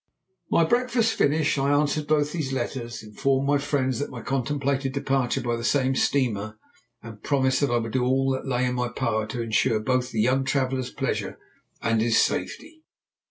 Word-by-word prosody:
My 170 - +4
breakfast 240 +3 +1
finished, 150 0 +1
I 135 +1 +1
answered 145 +1 +1
both 150 -1 +2
these 150 -5 -3
letters, 120 -4 -4
informed 135 +5 0
my 145 0 +3
friends 135 -3 -1
of 145 - -3
my 120 -3 -8
contemplated 135 +1 -1
departure 135 -3 0
by 120 -1 -1
the 115 - -5
same 135 +1 +2
steamer, 110 -6 0 0.5
and 110 -2 -10
promised 130 -2 +1
that 140 - +2
I 120 - +2
would 115 -1 -3
do 130 0 0
all 135 +1 +2
that 130 +1 -3
lay 130 -1 +1
in 125 - -1
my 125 0 -1
power 110 -1 -1
to 115 +2 -4
ensure 115 0 +1
both 125 +3 0
the 115 - -3
young 130 +5 +2
traveller's 130 -2 -1
pleasure - - -3 0.5
and 115 -1 +2
his 115 0 +3
safety. 320 -1 -2
130 Hz, 185 wpm, -25 LUFS, 120-140 Hz, 0.5 s, My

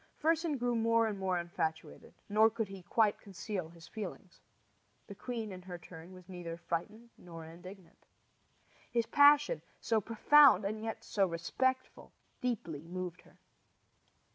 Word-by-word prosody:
Fersen 325 -1 +1
grew 245 -1 0
more 230 0 +3
and 210 -3 -3
more 190 -2 0
infatuated, 170 -2 -4
nor 215 +2 +5
could 225 -2 -3
he 195 -1 -9
quite 210 +3 +1
conceal 195 -3 -5
his 165 -1 -14
feelings. 195 -4 -8 0.7
The 205 - -9
queen, 225 0 -5
in 185 -1 -8
her 180 -1 -8
turn, 165 +1 -12
was 185 -1 -14
neither 175 -3 -7
frightened 210 +8 -5
nor 165 -2 -10
indignant. 180 +3 -13 0.8
His 235 -1 +1
passion, 290 - +5 0.2
so 225 -2 +1
profound 230 +1 +6
and 215 +2 -3
yet 225 0 -5
so 195 -2 +1
respectful, 260 +10 -2 0.3
deeply 165 - -3
moved 180 0 -5
her. - - -22
200 Hz, 140 wpm, -33 LUFS, 175-230 Hz, 0.8 s, profound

